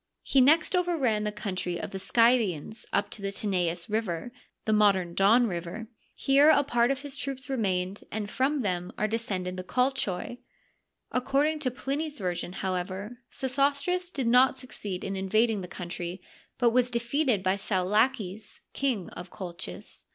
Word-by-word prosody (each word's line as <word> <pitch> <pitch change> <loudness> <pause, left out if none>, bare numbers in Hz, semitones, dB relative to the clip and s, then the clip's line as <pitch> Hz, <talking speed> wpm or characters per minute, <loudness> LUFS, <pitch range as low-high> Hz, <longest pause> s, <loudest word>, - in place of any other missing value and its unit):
He 270 - +4
next 310 +7 +5
over 355 -1 +1
ran 220 -7 +1
the 210 - 0
country 185 -4 -3
of - - -5
the 195 - -5
Scythians 225 -4 +2
up - - 0
to 210 - -6
the 200 - -2
Tanais 180 -4 -1
River 215 -1 -2 0.3
(the 220 - +2
modem 195 -5 +3
Don 215 +7 +5
River 175 +1 -4
f). 225 - -9 0.3
Here 280 +3 +5
a 295 -2 +5
part 240 -3 +2
of 275 0 -1
his 285 -2 -6
troops 270 +1 -5
remained, 195 -5 -1
and 215 -1 -3
from 265 +5 0
them 180 -3 -1
are 215 - +1
descended 195 -5 -2
the 185 - -4
Colchoi. 245 -2 -1 0.7
According 285 +5 +1
to 280 -4 0
Pliny's 285 +4 -3
version, 180 -2 -3
however, 190 +5 -3
Sesostris.did 280 +4 0
not 250 +3 +5
succeed 205 -7 -6
in 195 - -3
invading 210 +3 +1
the 180 - -6
country, 175 0 -5 0.4
but 240 -2 +3
was 245 +1 +3
defeated 240 -2 +1
by 185 0 +2
Saulaces, 205 +2 0
King 250 -10 -1
of 175 +1 -8
Colchis. 180 -1 -7
220 Hz, 160 wpm, -28 LUFS, 185-265 Hz, 0.7 s, next